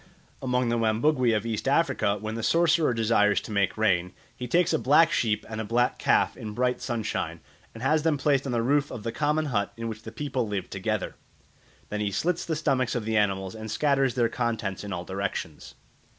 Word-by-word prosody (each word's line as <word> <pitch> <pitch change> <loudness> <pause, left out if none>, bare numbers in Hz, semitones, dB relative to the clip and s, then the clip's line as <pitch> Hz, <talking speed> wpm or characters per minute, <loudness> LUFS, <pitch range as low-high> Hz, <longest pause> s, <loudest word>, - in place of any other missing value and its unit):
Among 125 -2 0
the 120 0 +1
Wambugwe 120 +3 +2
of 105 - -4
East 115 +1 -3
Africa, 135 -8 +2
when 110 +1 -4
the 115 - -4
sorcerer 165 +4 +3
desires 110 -3 +3
to - - -9
make 100 -1 +1
rain, 90 -5 +1 0.2
he 125 0 -6
takes 175 +6 +2
a 160 - +2
black 160 +5 +5
sheep 105 -3 0
and 110 0 -4
a - - -3
black 120 +3 +1
calf - - +2
in 105 -1 -7
bright 125 0 0
sunshine, 115 -4 -3 0.4
and 115 - -8
has 155 +3 +3
them 160 -1 +1
placed 140 -1 +1
on - - -2
the 120 -1 0
roof 145 +3 +2
of 110 - -7
the 115 - -2
common 150 +4 0
hut 100 -2 0
in 115 0 -4
which 110 -1 -6
the - - -9
people 130 -5 -2
live 100 -2 -4
together. 100 +1 -3 0.7
Then 105 - -3
he 105 -1 0
slits 165 - -1
the 160 - -1
stomachs 135 -5 0
of 120 -3 -2
the 110 0 -1
animals 95 -3 +1
and 110 0 -7
scatters 135 0 +1
their 120 -2 +3
contents 115 -5 -2
in 100 - -6
all 90 -1 -4
directions. 95 -5 -5
115 Hz, 210 wpm, -26 LUFS, 105-135 Hz, 0.7 s, black